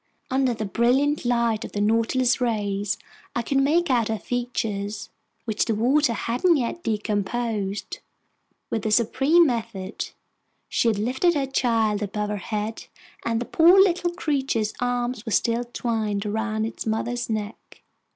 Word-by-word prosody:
Under 260 -2 +2
the 220 - -3
brilliant 255 +8 +2
lighting 235 -2 +1
of - - -19
the 205 - -2
Nautilus's 230 +4 +2
rays, 205 -3 -1 0.4
I 235 - 0
could 270 +4 +1
make 315 +4 +2
out 235 -3 +2
her 220 - -1
features, 215 -4 -3 0.3
which 220 -2 0
the 225 - 0
water 250 +4 +3
hadn't 250 - +2
yet 265 +7 -2
decomposed. 210 - -2 0.7
With 220 - -1
a - - +1
supreme 270 +10 +4
effort, 225 -4 -5 0.5
she - - +1
had 220 -3 +2
lifted 265 - +1
her 280 -2 +1
child 225 -5 +1
above 210 +1 -2
her 210 - -2
head, 215 +3 -4 0.4
and 230 -1 0
the 240 - -3
poor 345 +8 +6
little 355 -2 +3
creature's 270 - -1
arms 245 -1 -1
were 225 - -5
still 235 +3 +1
twined 220 -4 -2
around 220 +1 -1
its 225 - -5
mother's 240 +2 -2
neck! 215 0 -5
230 Hz, 150 wpm, -24 LUFS, 215-255 Hz, 0.7 s, poor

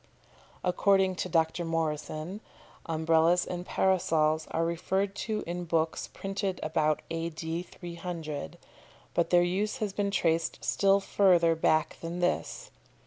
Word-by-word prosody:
According 190 +1 +3
to 185 - -2
Dr. 165 +1 +1
Morrison, 165 +3 -3 0.5
Umbrellas 165 +2 +3
and 180 0 -5
Parasols 160 -4 +2
are 165 - 0
referred 190 +4 -1
to 215 -1 -1
in 175 +1 -4
books 165 -1 0
printed 195 -1 -3
about 155 -1 +1
A.D. 165 0 -3
300, 170 - -6 0.6
but 170 -1 +1
their 175 -1 +5
use 195 +4 -1
has 210 -3 -2
been 200 0 0
traced 165 -4 +1
still 195 0 +3
further 180 -4 +4
back 160 -1 +1
than 170 +1 -4
this. 180 - -1
170 Hz, 125 wpm, -29 LUFS, 160-190 Hz, 0.6 s, their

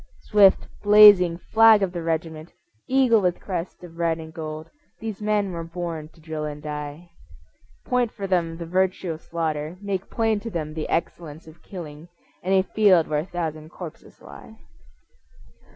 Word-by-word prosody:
Swift 200 -3 +4
blazing 205 -5 +7
flag 220 +2 +5
of 190 - -1
the 175 -1 -5
regiment, 160 0 -4 0.4
Eagle 255 -4 +3
with 180 -2 0
crest 180 -1 -6
of 170 -1 -12
red 165 -1 +1
and 160 -1 -10
gold, 155 -1 -7 0.3
These 220 -2 -6
men 210 -2 0
were 170 -1 -5
born 165 -2 -6
to - - -20
drill 155 -1 -6
and 150 -1 -5
die. 150 +3 -7 0.7
Point 250 -2 +1
for 200 - -6
them 170 -3 -1
the 170 - -6
virtue 185 +1 0
of 160 0 -7
slaughter, 160 0 -3
Make 195 -2 -4
plain 225 -2 0
to 230 - -7
them 155 -6 -4
the 155 -1 -5
excellence 165 -2 -4
of 160 +1 -16
killing 160 -4 -10 0.3
And 190 +2 +1
a 190 - +4
field 190 -5 +3
where 150 -1 0
a 155 - -4
thousand 160 -4 -5
corpses 170 -2 -11
lie. - - -13
170 Hz, 170 wpm, -24 LUFS, 160-195 Hz, 0.7 s, blazing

